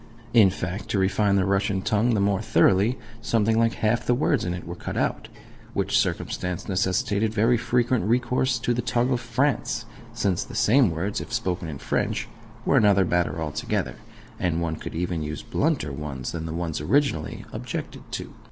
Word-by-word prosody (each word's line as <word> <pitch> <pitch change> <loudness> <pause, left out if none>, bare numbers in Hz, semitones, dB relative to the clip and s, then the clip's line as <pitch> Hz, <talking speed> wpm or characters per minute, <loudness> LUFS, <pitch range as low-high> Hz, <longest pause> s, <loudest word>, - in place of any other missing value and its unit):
In 110 -5 +7
fact, 90 +2 -5
to - - 0
refine 100 +1 +2
the 95 -2 +3
Russian 100 -1 +1
tongue 110 +2 +2
the - - +1
more 100 0 +2
thoroughly, 110 +1 +3 0.2
something 115 -1 +2
like 115 0 +3
half 110 +2 +1
the 125 - +2
words 135 -1 +1
in 90 0 -2
it 85 - -8
were 85 - -5
cut - - -6
out: - - -1 0.5
which - - 0
circumstance 90 -1 -1
necessitated 100 +3 0
very 115 +3 +4
frequent 120 -2 +1
recourse 125 +2 +1
to 120 +1 0
the 120 - -1
tongue 120 +2 +1
of 125 - +1
France, 120 0 0 0.3
since 100 -6 0
the - - -10
same 125 0 +4
words, 85 +5 -2
if - - -9
spoken 95 -7 -1
in 75 -3 -5
French, - - -1 0.4
were - - +4
another 100 -2 +5
matter 85 -1 0
altogether, 75 -2 -2 0.4
and 85 -5 0
one 85 -2 -1
could - - -7
use 85 - -1
even 80 -4 -3
blunter 70 - +1
ones 70 -3 -5
than 80 -1 -4
the 80 - -4
ones 85 -3 -2
originally 80 - 0
objected - - -5
to. - - -5
100 Hz, 180 wpm, -25 LUFS, 85-115 Hz, 0.5 s, In